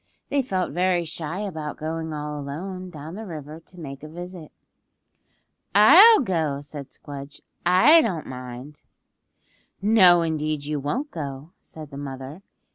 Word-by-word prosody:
They 280 - +2
felt 190 -8 -2
very 180 -1 +1
shy 165 +3 -5
about 160 -7 -5
going 160 +1 -4
all 150 -1 -5
alone 180 +6 -6
down 155 0 -9
the 215 +2 -7
river 155 -2 -8
to 175 +2 -17
make 140 -4 -8
a 155 - -8
visit. 175 -1 -9 1.2
"I'll 350 - +9
go," 160 - -1
said 145 -1 -9
Squdge. 140 0 -10 0.3
"I 245 - +7
don't 185 - -2
mind." 130 +4 -9 1.0
"No 190 -5 +6
indeed 155 -2 -2
you 150 0 -2
won't 250 - -3
go," 140 0 -6
said 155 -2 -12
the 140 - -8
mother. 135 +3 -7
160 Hz, 140 wpm, -24 LUFS, 145-185 Hz, 1.2 s, I'll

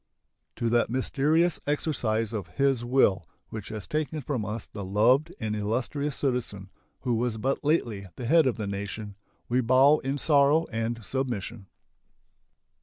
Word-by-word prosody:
To 120 - -1
that 120 0 +2
mysterious 150 +6 +1
exercise 115 -7 -1
of 100 -5 -4
His 135 -3 +2
will 120 -7 +3 0.3
which 110 -3 -7
has 105 -3 -5
taken 155 0 -2
from 130 -4 -2
us 105 +1 -4
the 105 - -8
loved 120 - +3
and 110 -1 -2
illustrious 125 +7 -2
citizen 115 -8 -2 0.3
who 125 -2 0
was 115 0 0
but 135 +7 -1
lately 115 - 0
the 125 - -6
head 160 +3 +5
of 125 - 0
the 110 - -3
nation 100 +1 -5 0.3
we 125 +2 +2
bow 130 +5 +5
in 135 +2 -2
sorrow 145 +2 +4
and 115 0 -3
submission. 115 -4 -3
120 Hz, 150 wpm, -27 LUFS, 110-140 Hz, 0.3 s, head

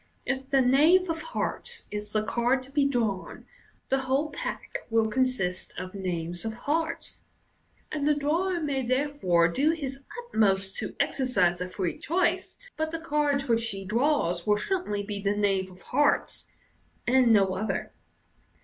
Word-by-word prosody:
if 265 0 -2
the 275 -1 +4
knave 320 +8 +5
of 325 0 -4
hearts 475 +8 -3
is 210 0 -4
the 215 0 +1
card 245 +4 +1
to 265 - -13
be 280 -1 +3
drawn, 225 -8 -2 0.4
the 270 - +2
whole 265 +3 0
pack - - -4
will 225 -1 +3
consist 220 -6 -1
of 185 0 -6
knaves 175 -3 -3
of 220 -1 -3
hearts, 320 +3 -2 0.7
and 295 -1 -1
the 300 - +4
drawer 340 +6 0
may 285 -4 -1
therefore 255 -10 +2
do 270 - +2
his 275 -4 -4 0.3
atmost 195 -2 +2
to - - -4
exercise 180 -10 +1
a 180 - -3
free 185 -2 -3
choice, 360 +2 0 0.2
but 315 0 -1
the 330 - -3
card 295 -3 +1
which 230 -2 +1
he 195 -2 -5
draws 215 - +1
will 210 0 +4
certainly 210 - -1
be 200 0 -5
the 200 +1 0
knave 195 -2 +1
of 185 0 -16
hearts, 290 +3 +1 0.6
and 250 -1 +4
no 195 -3 +4
other. 215 +4 -3
255 Hz, 160 wpm, -27 LUFS, 200-295 Hz, 0.7 s, knave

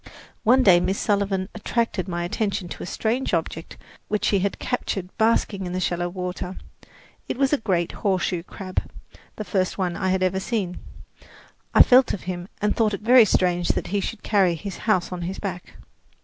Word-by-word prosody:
One 250 +3 +4
day 180 -5 +7
Miss 185 +3 0
Sullivan 200 -2 0
attracted 220 -3 -1
my 175 -2 -2
attention 200 +1 -2
to - - -8
a - - -5
strange 230 0 -1
object 165 0 -4 0.3
which 210 0 -1
she 200 - +3
had 200 +1 -1
captured 195 -7 -3
basking 220 -4 +1
in 180 - -5
the 185 - -1
shallow 175 -1 -1
water. 180 0 -5 0.7
It - - -3
was 275 +1 +2
a 290 - +3
great 180 -6 0
horseshoe 185 -3 -1
crab 185 +1 -5 0.5
the 215 - -5
first 185 -3 -1
one 180 -3 -1
I 190 - -1
had 185 0 +1
ever 185 +1 +1
seen. 190 -3 -2 1.0
I - - +10
felt 255 0 +5
of 200 - -5
him 175 -1 -5
and 210 0 +1
thought 215 -3 +2
it - - -10
very 240 +1 +7
strange 180 -3 +1
that - - -3
he 205 - +2
should 210 +2 -5
carry 190 -5 +3
his 190 +4 -6
house 185 -4 +2
on 180 -1 -5
his 180 +3 -4
back. 185 -3 -6
190 Hz, 190 wpm, -24 LUFS, 180-215 Hz, 1.0 s, I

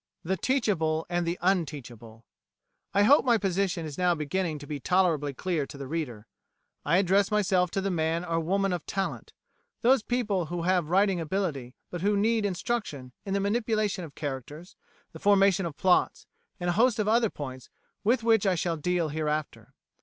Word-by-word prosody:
The 190 +3 0
Teachable 170 - 0
and 175 -1 0
the 170 +2 -1
Unteachable 125 - -2 0.7
I 200 - +3
hope 280 +8 +6
my 240 -3 +4
position 190 -3 -1
is 150 0 -7
now 180 -1 +3
beginning 155 +2 -2
to 145 - -10
be 145 -1 -5
tolerably 165 -3 +1
clear 155 +1 -2
to - - -10
the 140 - -6
reader. 130 -8 -4 0.6
I 165 +4 +3
address 195 +1 +3
myself 190 -4 +2
to 195 - -2
the 195 0 -1
man 165 0 0
or 165 -1 0
woman 195 +3 0
of 175 - -5
talent 195 0 -3 0.5
those 255 +1 +5
people 210 -8 -1
who 175 +1 -4
have 180 -3 +1
writing 190 0 +3
ability, 155 -7 -3 0.2
but 175 - -5
who 205 +2 +2
need 220 0 +2
instruction 180 - -3 0.2
in 195 - -1
the - - +1
manipulation 215 -2 0
of 150 -4 -10
characters, 145 +4 -6 0.4
the - - -11
formation 195 -2 +3
of 150 - -9
plots, 185 -1 +2 0.3
and 175 0 0
a - - -1
host 230 +4 +3
of 215 -1 0
other 225 0 +3
points 130 -6 -8 0.3
with 230 +2 +2
which 225 -3 +3
I 185 - +3
shall 170 -1 -1
deal 175 +1 0
hereafter. 150 0 -3
180 Hz, 180 wpm, -28 LUFS, 155-200 Hz, 0.7 s, hope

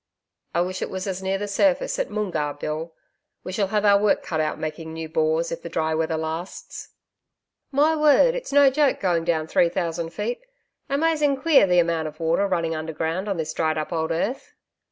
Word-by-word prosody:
'I 170 - +3
wish 185 +1 -3
it - - -2
was 190 0 -4
as 190 -1 -3
near 190 0 -1
the 205 +1 -4
surface 300 - +1
at - - -1
Moongarr, 160 -9 -2
Bill. 155 +3 -5 0.5
We - - -6
shall 195 +1 0
have 210 +1 0
our 200 -1 +5
work 210 -1 +2
cut 160 - -3
out 155 0 -1
making 160 +1 -5
new 160 0 -5
bores, 160 +1 0
if 165 - -4
the 170 - -7
dry 160 -1 -1
weather 160 0 0
lasts.' 160 +3 -6 0.8
'My 295 +3 +3
word, 305 - +5
it's - - -5
no 280 -1 +6
joke 290 0 +2
going 170 -3 0
down 160 -2 0
three 170 +2 +3
thousand 170 -2 -2
feet. 215 +8 -4 0.5
Amazing 295 -1 +2
queer 285 -8 +5
the 180 -1 +3
amount 165 -2 +2
of 155 0 -10
water 165 +5 +1
running 170 -3 0
underground 160 +5 -3
on 195 - -1
this 155 -1 -3
dried 155 -1 0
up 155 +3 -3
old 160 -1 -1
earth.' 200 +11 -3
175 Hz, 200 wpm, -24 LUFS, 160-210 Hz, 0.8 s, no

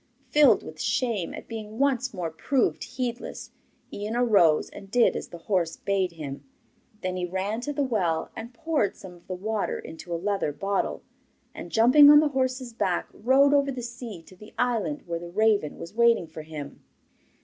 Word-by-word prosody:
Filled 295 -1 +5
with - - -9
shame 230 -9 0
at - - -9
being 220 -1 -7
once 265 -1 +1
more 175 -5 -4
proved 255 - 0
heedless, 250 -1 -5 0.4
Ian 210 +3 -4
arose 200 -11 +4
and 195 -1 -11
did 240 +3 +3
as - - -4
the 170 - -10
horse 170 -2 -1
bade 190 -3 -1
him. 145 -4 -7 0.6
Then 185 0 -2
he 180 - -1
ran 195 +5 -2
to 290 - -3
the 290 0 0
well 185 -11 -1
and 230 +2 -7
poured 285 -3 -1
some 185 -2 -11
of 175 -1 -19
the 185 - -4
water 210 +3 -2
into 165 +2 -10
a 170 - 0
leather 195 -3 -1
bottle, 195 +6 -2 0.5
and - - -9
jumping 255 +6 +7
on 295 0 +9
the 305 0 +3
horse's 260 -2 -2
back 185 -5 -1
rode 275 +4 +4
over 280 -1 +3
the 250 -2 -6
sea 235 -7 -8
to 185 - -16
the 210 +3 -15
island 245 +4 0
where 170 -1 -3
the 170 0 -8
raven 205 -4 +1
was 170 - -9
waiting 235 -4 +4
for 160 0 -9
him. 155 -2 -8
215 Hz, 185 wpm, -26 LUFS, 180-250 Hz, 0.6 s, on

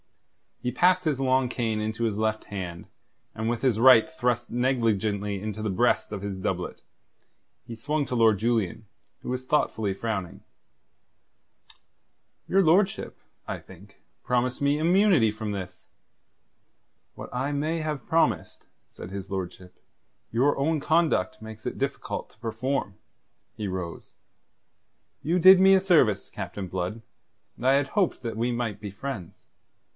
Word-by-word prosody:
He 125 - 0
passed 180 +3 +3
his 150 -4 0
long 130 -1 +2
cane 115 -4 -1
into 110 +2 -3
his 110 -3 0
left 110 0 -1
hand, 90 -4 -6 0.5
and 110 +1 -2
with 120 0 -2
his 120 -5 +2
right 130 +4 +7
thrust 125 -7 -1
negligently 110 -5 0
into 110 0 -5
the 110 - -1
breast 120 +4 +1
of 105 -2 -5
his 100 -1 -5
doublet, - - -3 0.8
he 120 -1 -7
swung 145 +6 -1
to 125 - -3
Lord 110 -3 +4
Julian, 110 -1 -1 0.4
who - - -7
was 125 +1 -3
thoughtfully 110 -8 0
frowning. 95 -3 -4 2.1
"Your 195 +1 +3
lordship, 190 +4 +2 0.3
I - - -3
think, - - -16 0.2
promised 125 +1 0
me 140 +1 +2
immunity 170 - +4
from 110 0 -5
this." 95 -3 -7 1.3
"What - - -9
I 130 +3 -1
may 155 +3 -1
have 150 -4 -4
promised," 125 - 0 0.2
said - - -10
his 95 0 -7
lordship, 95 -1 -6 0.5
"your 130 +6 +2
own 155 +3 +1
conduct 155 - +1
makes 110 0 -10
it - - -4
difficult - - -3
to - - -26
perform." 115 -2 -2 0.6
He 105 - -4
rose. 90 -3 -6 1.1
"You 170 +4 +1
did 185 +2 +9
me 190 +1 +7
a 190 - +6
service, 130 - +3
Captain 95 -2 -6
Blood, 95 +5 -4 0.6
and 125 - -7
I 135 - +6
had 140 0 +2
hoped 200 -4 0
that 115 -2 -5
we 120 +2 0
might 120 -4 -3
be 105 -1 -7
friends. 100 -4 -7
115 Hz, 145 wpm, -26 LUFS, 105-140 Hz, 2.1 s, did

